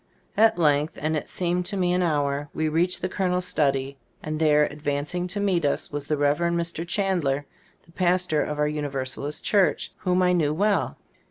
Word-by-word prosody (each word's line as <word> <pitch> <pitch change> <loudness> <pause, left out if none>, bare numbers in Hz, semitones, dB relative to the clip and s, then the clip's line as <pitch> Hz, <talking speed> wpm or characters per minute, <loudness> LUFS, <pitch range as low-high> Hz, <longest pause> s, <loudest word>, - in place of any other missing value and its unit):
At 220 -3 +4
length, 150 -2 +2
and 155 +1 -1
it 150 - -4
seemed 180 0 -1
to 200 - -3
me 180 -1 +1
an 180 - +1
hour, 145 -3 0
we 155 - 0
reached 170 +4 +1
the - - +1
coloners 180 -1 -1
study, 135 -2 0 0.3
and 155 0 -3
there, 150 -1 +4
advancing 150 +4 -2
to 205 +3 -4
meet 190 -4 +1
us, 145 - -1
was 145 -1 -5
the 150 - 0
Rev 145 +1 +2
erend 170 0 +1
Mr. 170 0 -3
Chandler, 170 -7 0 0.4
the 165 - -21
pastor 180 -3 +1
of 150 - -3
our 150 0 +2
Universalist 145 -1 -3
church, 200 -3 +2
whom 185 0 +1
I 180 0 +3
knew 155 -4 +1
well. 195 - +1
160 Hz, 190 wpm, -25 LUFS, 145-180 Hz, 0.4 s, At